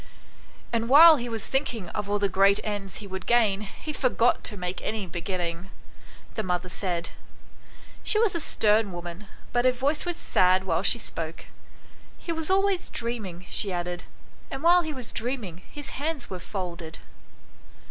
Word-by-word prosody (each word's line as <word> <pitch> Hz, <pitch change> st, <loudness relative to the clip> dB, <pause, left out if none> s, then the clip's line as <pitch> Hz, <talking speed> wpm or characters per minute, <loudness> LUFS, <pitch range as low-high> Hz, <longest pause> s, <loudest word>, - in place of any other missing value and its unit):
" -, -, -26 dB
And 230 Hz, 0 st, 0 dB
while 315 Hz, +3 st, +10 dB
he 240 Hz, -1 st, -4 dB
was 225 Hz, -1 st, -3 dB
thinking 240 Hz, -8 st, -1 dB
of 205 Hz, +2 st, -4 dB
all 205 Hz, -, +2 dB
the 200 Hz, -1 st, +2 dB
great 195 Hz, +1 st, +4 dB
ends 205 Hz, -2 st, -4 dB
he 210 Hz, -, -6 dB
would 190 Hz, -1 st, -6 dB
gain 220 Hz, -4 st, +3 dB
he 215 Hz, +9 st, -7 dB
forgot 245 Hz, -3 st, +2 dB
to 210 Hz, -, -4 dB
make 180 Hz, 0 st, -4 dB
any 215 Hz, -3 st, -2 dB
beginning," 175 Hz, 0 st, -4 dB, 0.6 s
the 220 Hz, -, -2 dB
mother 180 Hz, -2 st, -2 dB
said. 180 Hz, -3 st, -2 dB, 0.9 s
She -, -, +2 dB
was 440 Hz, -2 st, +3 dB
a 335 Hz, -, -1 dB
stern 215 Hz, -, +2 dB
woman, 175 Hz, +3 st, -7 dB, 0.3 s
but 245 Hz, 0 st, +3 dB
her 255 Hz, -, +6 dB
voice 275 Hz, +5 st, 0 dB
was 350 Hz, -1 st, -3 dB
sad 185 Hz, +1 st, +3 dB
while 170 Hz, -3 st, 0 dB
she 205 Hz, -, +6 dB
spoke. 165 Hz, -7 st, -5 dB, 0.4 s
" -, -, -26 dB, 0.3 s
He 335 Hz, -, -5 dB
was 320 Hz, 0 st, -2 dB
always 390 Hz, -1 st, +2 dB
dream 235 Hz, -3 st, -3 dB
ing," 175 Hz, 0 st, -10 dB
she 200 Hz, -, 0 dB
added, 175 Hz, 0 st, -3 dB, 0.2 s
" -, -, -28 dB
and 270 Hz, +2 st, -6 dB
while 350 Hz, +1 st, +6 dB
he 315 Hz, -2 st, -4 dB
was 255 Hz, -5 st, -6 dB
dreaming 225 Hz, -7 st, -3 dB
his 290 Hz, -1 st, -7 dB
hands 295 Hz, -4 st, -3 dB
were 185 Hz, -, -4 dB
folded." 175 Hz, -4 st, -6 dB
210 Hz, 180 wpm, -26 LUFS, 185-265 Hz, 0.9 s, while